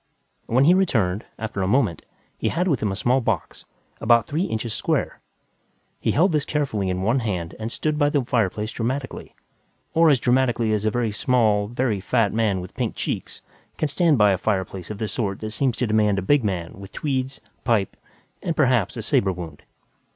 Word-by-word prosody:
When 125 +3 +3
he 165 +5 +6
returned, 115 - +1
after 110 -3 -4
a 95 - 0
moment, 110 -5 +1 0.3
he - - -1
had 180 +2 0
with 145 -9 +2
him 105 - 0
a - - -2
small 125 +6 +2
box, 115 -6 -3 0.3
about 115 -1 +4
three 160 +6 -1
inches 110 - -3
square. - - -1 0.8
He - - -1
held 180 +5 +3
this 150 -2 +1
carefully 125 -12 -1
in 90 0 -2
one 115 +6 +2
hand 90 -8 -3
and 110 +1 -4
stood 155 +2 -1
by 145 -1 +4
the 145 -2 +1
fireplace 110 -2 0
dramatically 130 +4 -4 0.6
or 165 0 +5
as 140 -4 +4
dramatically 120 -3 +2
as 105 0 -1
a - - +4
very 115 0 -1
small, 105 -2 +2
very 120 -2 -1
fat 110 +1 +1
man 105 -4 +1
with 90 - -10
pink - - -2
cheeks - - -4 0.3
can 155 - 0
stand 160 -1 +3
by 105 -2 +5
a 95 - 0
fireplace 95 -3 -2
of 105 - -5
the 110 0 -2
sort 100 -2 -2
that 110 0 -4
seems 125 +1 0
to 125 - 0
demand 105 -2 +2
a 95 - -1
big 145 +5 +3
man 90 -3 -3
with 100 0 -10
tweeds, 135 -2 -2 0.2
pipe 115 -6 +1 0.5
and, 165 - -2
perhaps, 125 - +2
a - - -4
saber 95 - +2
wound. 85 -5 -8
115 Hz, 195 wpm, -23 LUFS, 100-130 Hz, 0.8 s, he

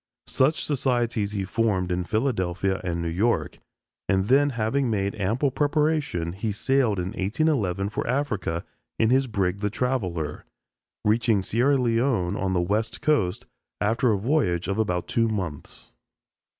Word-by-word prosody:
Such 135 +1 +1
societies 120 -7 0
he 100 -2 -2
formed 95 -4 0
in 90 0 -1
Philadelphia 95 -5 0
and 85 -2 -2
New - - -2
York, 100 +8 0 0.5
and 95 +1 +1
then 145 +2 +5
having 125 +2 0
made 100 -2 0
ample 115 +8 0
preparation 145 - 0
he 105 +3 -2
sailed 125 0 +1
in 90 0 -2
1811 100 - 0
for 105 - -3
Africa 110 - -1 0.3
in 110 +1 +3
his 135 +1 +3
brig 100 -4 -1
"The 105 0 0
Traveller," 95 - -2 0.6
reaching 110 -2 +2
Sierra 125 +8 +2
Leone 115 -6 +1
on 95 -3 -1
the 90 - +2
West 105 +5 -1
Coast 120 -6 +1 0.3
after 115 +4 +2
a 105 - +2
voyage 100 - 0
of 100 +2 -1
about 90 -5 0
two 115 -1 +1
months. 95 -10 -5
110 Hz, 145 wpm, -25 LUFS, 95-125 Hz, 0.6 s, then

